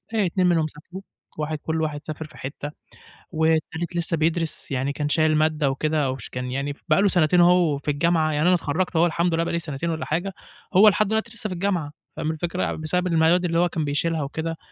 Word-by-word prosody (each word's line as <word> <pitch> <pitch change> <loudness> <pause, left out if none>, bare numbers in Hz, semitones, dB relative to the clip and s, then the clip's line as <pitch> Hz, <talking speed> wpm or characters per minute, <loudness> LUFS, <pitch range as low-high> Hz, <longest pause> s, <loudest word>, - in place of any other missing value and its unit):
آآ، 210 -3 +2
2 180 +1 +1
منهم 165 -3 +2
سافروا، 165 +5 -11 0.4
واحد 155 0 -2
كل 160 +2 -2
واحد 150 -1 -3
سافر 155 0 -6
في 155 - -17
حتة، 145 +2 -6 0.6
والتالت 160 +1 0
لسه 170 -1 +1
بيدرس 165 0 -1
يعني 135 +1 -1
كان 145 0 -2
شايل 155 0 +3
مادة 155 -2 +2
وكده، 150 0 0
وش 130 -4 -7
كان 125 0 -5
يعني 140 +2 -2
ف - - -25
بقى - - +4
له 205 - +4
سنتين 175 -2 +4
اهو 175 -4 +4
في 145 +1 -2
الجامعة، 160 +1 +1
يعني 150 +3 +1
أنا 180 - +5
اتخرّجت 170 +2 -2
اهو 165 +1 +5
الحمد 170 0 0
لله 165 +1 +1
بقى 170 - -3
لي 170 - +1
سنتين 160 0 -4
والّا 160 -1 -3
حاجة، 175 +5 -2 0.4
هو 200 +4 +7
لحد 210 +1 +1
الوقتي 220 +1 -1
لسه 215 -1 -2
في - - -4
الجامعة 175 -5 -1 0.3
فاهم 155 0 -1
الفكرة؟ 175 +3 -3
يع - - -1
بسبب 180 +3 -1
المياد 170 +1 +3
اللي 165 -1 +1
هو 175 0 +3
كان 160 -3 -2
بيشيلها 150 +2 0
وكده 160 +3 -4
160 Hz, 225 wpm, -23 LUFS, 150-175 Hz, 0.6 s, هو